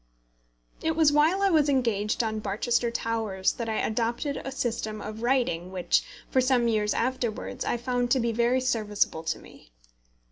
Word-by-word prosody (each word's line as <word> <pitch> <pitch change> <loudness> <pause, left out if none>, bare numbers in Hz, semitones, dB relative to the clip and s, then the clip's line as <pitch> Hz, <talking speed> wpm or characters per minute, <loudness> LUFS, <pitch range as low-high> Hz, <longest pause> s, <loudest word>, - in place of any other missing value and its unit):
It 320 0 0
was 315 -2 +5
while 315 +7 +3
I 395 - +4
was 305 -3 +4
engaged 230 -4 +1
on 220 -1 -2
Barchester 235 +4 0
Towers 225 -5 -1
that 230 -2 -5
I 220 - -1
adopted 235 +6 -1
a 270 - -5
system 220 -4 -3
of 215 +1 -7
writing 240 -9 0
which, 185 -2 +1 0.2
for 260 - +2
some 250 -2 +2
years 210 -2 +1
afterwards, 245 -1 -2
I - - 0
found 245 0 -1
to 260 - +3
be 235 -1 0
very 240 +3 +2
serviceable 210 -9 0
to 160 -1 -2
me. - - -16
235 Hz, 170 wpm, -27 LUFS, 215-255 Hz, 0.2 s, was